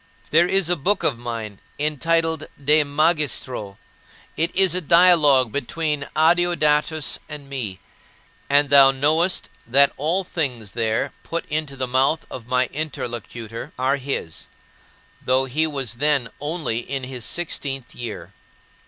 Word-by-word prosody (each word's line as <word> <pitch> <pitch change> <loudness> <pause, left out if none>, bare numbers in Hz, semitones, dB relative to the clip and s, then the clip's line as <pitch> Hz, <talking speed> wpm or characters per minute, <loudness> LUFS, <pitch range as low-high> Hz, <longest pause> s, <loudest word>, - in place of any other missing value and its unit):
There 170 +3 +5
is 195 -2 +1
a 175 - +2
book 185 +6 0
of 120 -6 +1
mine, 115 -4 -6 0.2
entitled 160 +2 0
De 150 +2 +4
Magistro. 145 - -1 0.6
It 165 +2 +1
is 190 -2 +5
a 185 - 0
dialogue 155 -7 +5
between 150 +1 -2
Adeodatus 160 -2 +2
and 150 -2 -8
me, 120 -9 -5 0.7
and 145 0 +3
thou 140 -1 +8
knowest 155 +7 +1 0.2
that 140 +3 +4
all 165 +7 +1
things 125 - -3
there 110 -1 -1
put 170 - -4
into 150 -2 -2
the 130 -1 -2
mouth 130 +5 +1
of 120 -2 -8
my 125 0 +2
interlocutor 120 -4 -6
are 130 +2 +1
his, 135 - -5 0.8
though 130 +1 +2
he 155 +5 0
was 135 -7 -3
then 140 -1 +1
only 145 -6 -2
in 135 +2 -5
his 125 -2 -6
sixteenth 140 -6 -2
year. 120 -3 -7
145 Hz, 135 wpm, -22 LUFS, 125-160 Hz, 0.8 s, thou